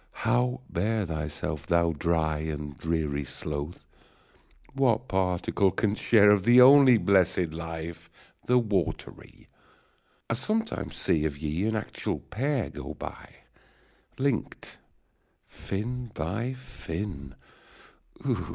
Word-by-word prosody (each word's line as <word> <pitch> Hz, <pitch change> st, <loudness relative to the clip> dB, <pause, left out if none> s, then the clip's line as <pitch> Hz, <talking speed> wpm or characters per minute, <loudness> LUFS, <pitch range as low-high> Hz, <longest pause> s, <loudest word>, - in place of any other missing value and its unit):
Kow 125 Hz, +1 st, +1 dB
bear 105 Hz, +4 st, -1 dB
thyself, 75 Hz, -2 st, -4 dB
thou 85 Hz, 0 st, +3 dB
dry 80 Hz, -1 st, 0 dB
And 75 Hz, -2 st, -5 dB
dreary 75 Hz, -2 st, -2 dB
sloth! 75 Hz, +4 st, -5 dB, 0.9 s
What 130 Hz, -3 st, +1 dB
particle 95 Hz, +1 st, +1 dB
canst 105 Hz, +4 st, -1 dB
share 105 Hz, -3 st, +6 dB
Of 100 Hz, -2 st, +3 dB
the 120 Hz, +4 st, +6 dB
only 130 Hz, -1 st, +8 dB
blessed 95 Hz, -4 st, +2 dB
life, 80 Hz, 0 st, -6 dB, 0.4 s
the 125 Hz, -, +4 dB
watery? 105 Hz, -8 st, -3 dB, 0.8 s
1 115 Hz, -, -1 dB
sometimes 225 Hz, -, -2 dB
see 75 Hz, -, +1 dB
of 75 Hz, -2 st, -2 dB
ye 80 Hz, +5 st, -2 dB
an 110 Hz, -, 0 dB
actual 110 Hz, -, -3 dB
pair 135 Hz, +3 st, -2 dB
Go -, -, -7 dB
by! -, -, -8 dB, 0.9 s
link'd 135 Hz, -4 st, -2 dB, 0.7 s
fin 120 Hz, +5 st, -5 dB
by 105 Hz, +10 st, -2 dB
fin 105 Hz, -, -7 dB
95 Hz, 105 wpm, -27 LUFS, 80-120 Hz, 0.9 s, only